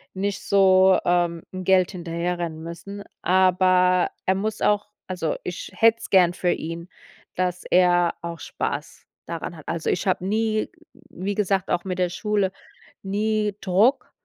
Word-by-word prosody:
nicht 200 0 -2
so, 190 -1 +5
ähm, 175 -1 +1
Geld 185 0 +2
hinterherrennen 170 -2 -4
müssen. 200 +4 -8 0.2
Aber 185 0 +3 0.2
er 190 - +3
muss 215 +2 -3
auch- 210 0 +1 0.2
also 180 -4 -2
ich 180 - -6
hätt's 225 0 +3
gern 180 -2 +5
für 175 -1 0
ihn- 165 +2 -5 0.5
dass 180 0 -1
er 175 -1 +3
auch 170 -1 -5
Spaß - - -5 0.2
daran 170 +1 -5
hat. 155 - -14
Also 165 -1 -2
ich 190 - -2
hab 185 - +2
nie 215 +2 0 0.2
wie 195 +3 -6
gesagt, 195 -2 0
auch 175 - 0
mit 185 -1 -3
der 180 -1 +2
Schule, 205 0 -1 0.5
nie 210 +1 -1
Druck 200 +8 +2
185 Hz, 145 wpm, -23 LUFS, 175-200 Hz, 0.5 s, so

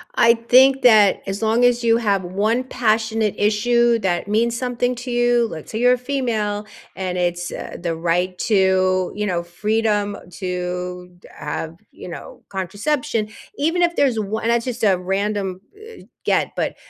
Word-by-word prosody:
I 230 0 +6
think 260 +3 +4
that 215 -5 +5
as 195 +2 -4
long 225 +2 +2
as 245 -1 +3
you 230 0 +4
have 200 -5 0
one 210 +7 0
passionate 220 -3 0
issue 235 +3 +2
that 185 -1 -1
means 230 +3 +1
something 245 0 -1
to 245 +1 -6
you, 240 -1 +2
let's 155 -7 -9
say 220 - -3
you're 245 +1 +5
a 250 - 0
female, 230 -6 -2 0.3
and 185 -1 -3
it's, 175 0 -1
uh, - - -7
the 170 -2 -2
right 175 +2 0
to, 185 -2 +2
you 210 0 -2
know, 175 -3 -1
freedom 205 +3 -1 0.2
to 180 0 -5 0.2
have, 160 0 -5 0.2
you - - -11
know, - - -10
contraception, 210 - -2 0.3
even 325 +5 0
if 345 0 +1
there's 260 -5 +2
o 215 +1 -2
and 230 - -2
that's 235 0 +1
just 245 -3 -5
a 195 -3 +4
random, 195 0 -2 0.2
eh, 445 +1 -13 0.2
get - - +1
but, - - -2
215 Hz, 165 wpm, -20 LUFS, 185-240 Hz, 0.3 s, I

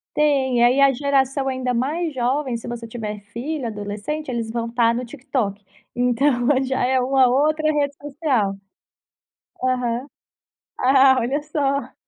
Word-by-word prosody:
Tem, 265 -5 +2
aí 255 +3 +4
a 275 -1 +6
geração 270 0 0
ainda 255 -1 -1
mais 300 +6 -1
jovem, 255 0 -1
se 230 - -10
você 235 -1 -6
tiver 215 -3 -5
filho 245 +6 -5
adolescente, 215 +8 -5
eles 230 -2 -3
vão 230 0 -3
estar 230 0 +2
no 245 +1 -3
TikTok. 235 -6 -3 0.3
Então 245 +1 +1 0.2
já 260 -1 -1
é 260 0 +2
uma 260 0 +3
outra 310 +4 +2
rede 285 -1 0
social. 265 -9 -1 1.1
Aham. 250 0 -1 0.7
Ah, 265 0 +5
olha 265 +5 -1
só. 280 -3 -2
255 Hz, 140 wpm, -22 LUFS, 235-280 Hz, 1.1 s, a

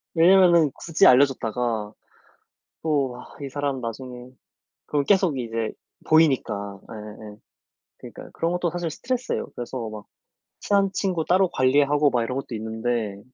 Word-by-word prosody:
왜냐면은 170 -3 +5
굳이 165 -2 +1
알려 130 +3 +7
줬다가 115 -4 -3 0.9
또 140 -5 0
아 - - -13
이 140 - -5
사람 140 -1 -3
나중에 125 +1 -7 0.6
그럼 145 -1 0
계속 185 -7 +3
이제 115 -2 -3 0.4
보이니까. 110 -11 +2
예예예. 105 -1 -10 0.6
그니까요. - - -11
그런 165 +1 -1
것도 175 -1 -1
사실 175 -1 -3
스트레스예요. 255 +9 -3
그래서 120 -1 -5
막 105 -1 -9 0.5
친한 200 -1 +2
친구 185 -5 -1
따로 185 +1 +3
관리하고 145 +2 +3
막 120 -2 +1
이런 125 +3 -3
것도 135 -3 -5
있는데 110 -1 -3
135 Hz, 315 characters per minute, -24 LUFS, 115-165 Hz, 0.9 s, 알려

